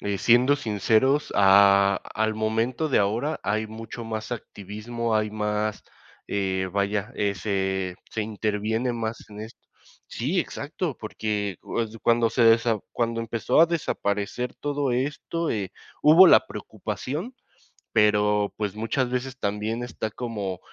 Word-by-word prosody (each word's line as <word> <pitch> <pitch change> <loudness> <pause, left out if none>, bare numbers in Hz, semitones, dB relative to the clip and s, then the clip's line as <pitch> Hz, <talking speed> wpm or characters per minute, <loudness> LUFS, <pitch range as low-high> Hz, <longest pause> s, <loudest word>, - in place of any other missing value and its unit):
eh, 100 -1 -2
siendo 125 +7 +4
sinceros, 120 +4 +1
a 100 0 +6 0.2
al 110 0 0
momento 115 +7 -1
de 135 - +3
ahora 115 +10 0
hay 110 +2 0
mucho 115 +2 -8
más 110 +1 -5
activismo, 110 +2 -4
hay 110 -1 +1
más, 105 0 -2 0.4
eh, 95 -2 -1
vaya, 100 +3 -1
eh, 100 -2 -1
se 95 -2 -1 0.2
se 110 - -2
interviene 110 +3 -1
más 115 -1 -4
en 105 0 -9
esto. 110 - -11 0.5
Sí, 160 +10 -1
exacto, 155 0 -4
porque, 105 -3 -3
pues, 115 -1 -3
cuando 115 -1 +3
se 115 -2 +5 0.3
cuando 115 -1 -1
empezó 115 +6 +1
a 170 - +8
desaparecer 125 -7 -2
todo 145 -2 -1
esto, 145 +6 -2
eh, 100 -4 -2 0.3
hubo 165 +5 +8
la - - +6
preocupación, 170 - -5 0.6
pero, 105 -1 +3
pues, 105 -2 -3
muchas 115 +4 -1
veces 130 +1 -3
también 105 +4 -2
está 110 -2 -4
como 105 -7 -4
110 Hz, 135 wpm, -25 LUFS, 105-125 Hz, 0.6 s, a